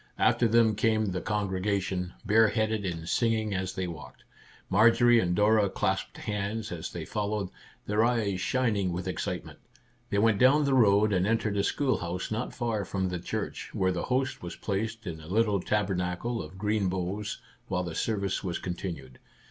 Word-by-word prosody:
After 120 - +3
them 115 -1 +4
came 110 +1 +2
the 90 - -3
congregation, 95 -3 -1
bare 110 +1 +5
headed, 110 -2 0
and 85 -2 -4
singing 110 0 +1
as 95 0 -2
they 95 -2 -1
walked. 85 -3 -9 0.4
Marjorie 120 +2 +5
and 90 -4 +1
Dora 105 0 +4
clasped 95 0 -2
hands 105 +1 -3
as 85 -2 -5
they - - -5
followed, 105 -2 -2 0.4
their 105 +2 +2
eyes 110 -6 +1
shining 105 -8 +1
with 90 +2 -4
excitement. 95 - -4 0.5
They 100 - 0
went 105 -1 +3
down 145 +4 +5
the 140 - +2
road 105 -4 +4
and 90 +1 +2
entered 110 -2 +1
a 100 - +1
schoolhouse 95 -10 -1
not 110 +3 -2
far 115 -4 -1
from 95 0 -2
the 90 -1 -3
church, 85 - -4
where 95 0 +1
the 90 -1 -2
host 130 +1 -1
was 85 0 -6
placed 110 +2 -3
in 80 -3 -5
a 80 - -12
little 105 +1 +2
tabernacle 95 +2 -1
of 80 +4 -10
green 105 -1 0
boughs 95 +3 -3 0.3
while 90 -1 -1
the 85 -2 -5
service 100 0 -1
was 90 -3 -2
continued. 85 -8 -6
100 Hz, 170 wpm, -28 LUFS, 90-110 Hz, 0.5 s, bare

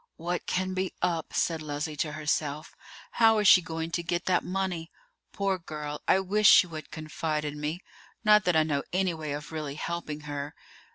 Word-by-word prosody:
"What 175 +2 -3
can 185 0 -1
be 185 0 -2
up?" 170 -3 0
said 165 -2 0
Leslie 150 0 -4
to 150 +1 -1
herself. 150 0 -2 0.4
"How 225 -1 +5
is 210 -1 +3
she 180 0 +9
going 165 -1 -4
to 170 - -1
get 175 0 -2
that 185 -1 +2
money? 185 -3 -3 0.4
Poor 195 -2 -1
girl, 150 -3 -6
I 190 - +5
wish 205 +2 +4
she - - +8
would 160 -3 -8
confide 155 0 -3
in 150 0 -5
me; 155 +5 -3 0.4
not 210 -1 +6
that 180 - +2
I 160 - +5
know 145 -3 0
any 185 -1 +1
way 155 -2 -5
of 150 +2 -6
really 150 -3 -4
helping 155 -2 -4
her. 145 0 -5
165 Hz, 190 wpm, -28 LUFS, 150-185 Hz, 0.4 s, she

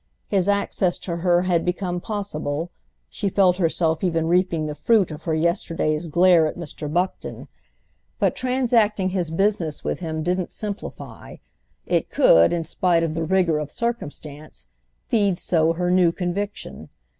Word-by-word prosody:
His 195 0 +1
access 200 -3 0
to 170 -2 -5
her 175 0 +2
had 175 -2 +1
become 180 0 -2
possible—she 160 - -5
felt 185 -2 +3
herself 165 -2 0
even 165 -3 +1
reaping 175 -2 +1
the 150 - -3
fruit 205 +2 +2
of 155 +1 -9
her 160 - 0
yesterday's 165 -1 -1
glare 170 0 +4
at 155 - -6
Mr. 150 -3 -6
Buckton; 180 +3 -3 0.7
but - - +1
transacting 235 -6 +1
his 180 -3 -2
business 170 -3 -1
with - - -2
him 160 -3 -4
didn't 180 +1 -1
simplify—it - - -6
could, 85 +1 +5
in 170 -1 -1
spite 170 +1 +1
of 160 -2 -1
the 165 +1 -2
rigour 175 -3 +2
of 150 -1 -5
circumstance, 155 -10 -6 0.4
feed 200 -5 +1
so 165 -2 +1
her 175 +1 -1
new 180 -2 +4
conviction. 180 - -5
175 Hz, 145 wpm, -23 LUFS, 160-190 Hz, 0.7 s, could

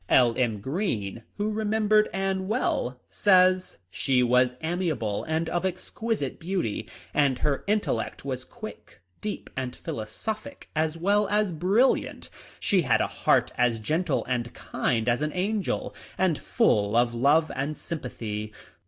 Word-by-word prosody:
L. 120 -2 +5
M. 115 -5 0
Greene, 120 - -2 0.2
who 210 +1 0
remembered 215 0 +2
Anne 195 -1 -1
well, 130 - 0
says, 185 -2 +4
" 90 - -46
She 130 -2 +2
was 125 +1 +3
amiable 160 - -1
and 160 +1 -1
of 175 +2 -1
exquisite 190 - -2
beauty, 170 - -2 0.2
and 140 -3 +3
her 140 +1 0
intellect 205 - -1
was 130 -2 -3
quick, - - -10 0.2
deep, 210 -1 -5
and 130 -1 -3
philosophic 215 - -5
as 160 +1 0
well 200 +4 +2
as 210 -2 +2
brilliant. 195 +11 +1 0.3
She 190 -3 +3
had 130 -7 +3
a - - +2
heart - - +2
as 120 -2 +3
gentle 155 +6 0
and 120 -2 -2
kind 115 -2 -1
as" 120 +3 +2
an 150 0 -1
angel, 200 +2 -1 0.2
and 185 -3 +2
full 105 +1 +2
of 120 0 +3
love 145 +7 +3
and 140 +3 -2
sympathy. 110 -8 -5
155 Hz, 145 wpm, -27 LUFS, 125-195 Hz, 0.3 s, L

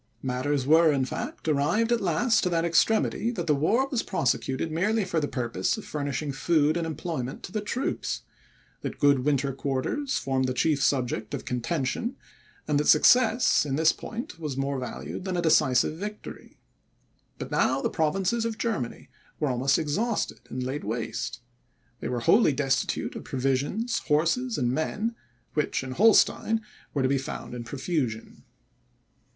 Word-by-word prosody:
Matters 130 +1 -1
were, 160 +2 +6
in 135 -2 +1
fact, 130 - -6
arrived 165 +11 +2
at 235 - +2
last 220 +6 +2
to 180 - +1
that 165 -1 +1
extremity, 220 +6 +2
that 175 -7 -3
the 155 - +3
war 210 - +2
was 255 -4 -1
prosecuted 135 -2 -1
merely 205 +6 +1
for 170 -3 0
the 145 - -1
purpose 115 - -1
of 215 - -8
furnishing 145 0 -3
food 155 +2 +2
and 170 -1 -1
employment 150 -4 -4
to - - -7
the 215 - -2
troops; 245 +6 -3 0.6
that - - -5
good 140 -2 +4
winter 140 0 0
quarters 140 - -2
formed 130 -1 0
the 130 - -2
chief 150 0 +2
subject 125 -6 0
of - - -7
contention; 135 - -2 0.5
and 150 -1 +2
that 150 - 0
success, 240 - +5
in 140 -2 -2
this 160 +2 +4
point, 230 -6 -7
was 150 -5 -4
more 135 0 -1
valued 125 +7 -6
than 185 -1 -2
a - - +1
decisive 155 -1 +3
victory. 210 +1 -8 0.8
But - - -7
now - - +2
the - - +1
provinces 195 +7 0
of 225 -1 -2
Germany 215 - -3 0.3
were 150 - +1
almost 130 +2 +2
all 165 - 0
exhausted 210 +10 -1
and 130 - -4
laid 135 +3 -3
waste. 115 +2 -4 0.6
They - - -4
were 120 -1 -2
wholly 180 - +5
destitute 135 -1 -1
of - - -6
provisions, 135 - -1
horses, 170 +12 +1
and 120 -2 +1
men, 210 - -1 0.4
which 150 -3 0
in 130 - -6
Holstein 225 +5 +4 0.3
were 140 - -1
to - - +3
be 135 +1 +1
found 130 - -6
in 120 -1 -5
profusion. 130 -2 -3
150 Hz, 165 wpm, -27 LUFS, 135-200 Hz, 0.8 s, were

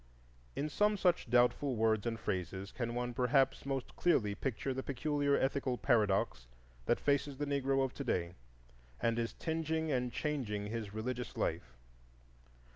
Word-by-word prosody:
In 150 - -1
some 210 +7 +2
such 180 -9 +2
doubtful 125 +3 +3
words 110 -1 +2
and 115 -1 -2
phrases 95 0 -3
can 120 -2 -3
one 120 0 -2
perhaps 135 +2 +2
most 135 -2 -3
clearly 120 -13 +2
picture 135 +4 -2
the 130 - -3
peculiar 140 +1 +1
ethical 135 -2 0
paradox 100 - +2 0.4
that - - +3
faces 140 -1 +1
the 145 - -1
Negro 135 -1 +1
of 130 - -5
to 140 - -5
day 85 -8 -1 0.7
and 115 0 +1
is 115 0 -2
tingeing 160 -1 -1
and 125 -2 0
changing 120 -10 -2
his 110 -1 -4
religious 120 +3 -4
life. 60 -1 -2
125 Hz, 150 wpm, -34 LUFS, 110-140 Hz, 0.7 s, doubtful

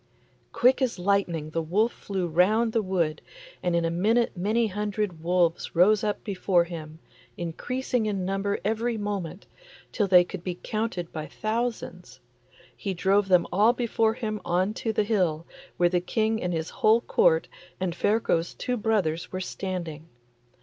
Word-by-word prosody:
Quick 255 +3 +3
as 255 -3 0
lightning 180 -5 0
the 165 - -1
wolf 205 +9 +1
flew 190 -3 -4
round 215 +8 +2
the 225 - +2
wood, 175 -6 -1 0.4
and 175 -1 0
in 170 -1 +1
a 165 - 0
minute 220 +8 +1
many 215 +6 +1
hundred 205 -4 -3
wolves 175 0 +1
rose 200 +5 +5
up 210 -1 -2
before 190 -3 +2
him, 160 -2 -8 0.4
increasing 240 +7 -2
in 195 -3 -2
number 195 +1 -1
every 225 +2 0
moment, 200 -4 -4 0.5
till 205 - 0
they 180 -2 +7
could 175 0 -8
be 180 -1 -3
counted 215 -6 -3
by 155 -1 -5
thousands. 215 - -4 0.6
He 195 -2 -4
drove 195 +3 +2
them 180 -2 +4
all 215 +5 +5
before 225 -2 +1
him 215 -3 -4
on 185 +4 0
to 225 - -2
the 215 -1 +1
hill, 180 -7 0 0.3
where 175 - +4
the 180 0 +1
King 220 +4 0
and 180 - -1
his 160 -1 -3
whole 220 +2 +5
Court 485 - +3 0.3
and 185 -2 -1
Ferko's 175 -3 0
two 250 -1 -2
brothers 200 -7 0
were 185 - -3
standing. 175 -5 -5
195 Hz, 160 wpm, -26 LUFS, 175-220 Hz, 0.6 s, they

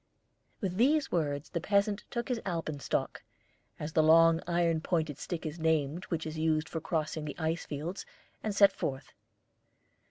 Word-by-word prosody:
With 185 -3 -2
these 285 +6 +3
words 145 -3 -1
the 170 - -2
peasant 200 +2 +1
took 235 -1 -3
his 245 -2 0
alpenstock, 165 -6 -2 0.6
as 150 +1 -5
the 155 - +5
long 165 +1 +6
iron 170 -2 +2
pointed 160 -4 -1
stick 170 0 -4
is 155 +2 -5
named 160 +1 +1
which 165 -2 -3
is 155 0 -5
used 155 0 +1
for 160 - -4
crossing 155 -1 -2
the 150 -2 -6
ice 165 0 -2
fields, 160 +6 -4 0.4
and 215 -2 -2
set 200 0 +7
forth. 135 0 -4
165 Hz, 160 wpm, -31 LUFS, 155-180 Hz, 0.6 s, set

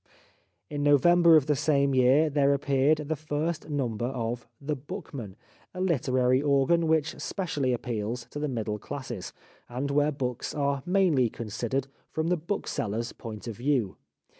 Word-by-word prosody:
In 145 -1 -4
November 165 +4 +6
of 150 -4 +5
the 150 - +2
same 140 -1 +2
year 130 +5 +5
there 140 -1 +3
appeared 140 +2 +2
the 160 - 0
first 155 +2 -3
number 120 -6 -1
of 120 -2 -3
The 150 +2 -2
Bookman, 140 - -7 0.4
a - - -5
literary 130 -7 +2
organ 145 +4 +3
which 160 -1 +1
specially 150 -9 -1
appeals 120 0 -3
to 145 - -5
the 150 - -1
middle 110 -5 -3
classes, - - -6 0.4
and 130 +4 -3
where 145 +1 +3
books 125 -4 -4
are 140 -1 0
mainly 175 -10 +3
considered 120 +5 -3 0.2
from 160 +1 -1
the 180 - +3
bookseller's 115 - -3
point 110 0 -8
of 115 -4 -5
view. 125 -6 0
140 Hz, 150 wpm, -28 LUFS, 125-155 Hz, 0.4 s, November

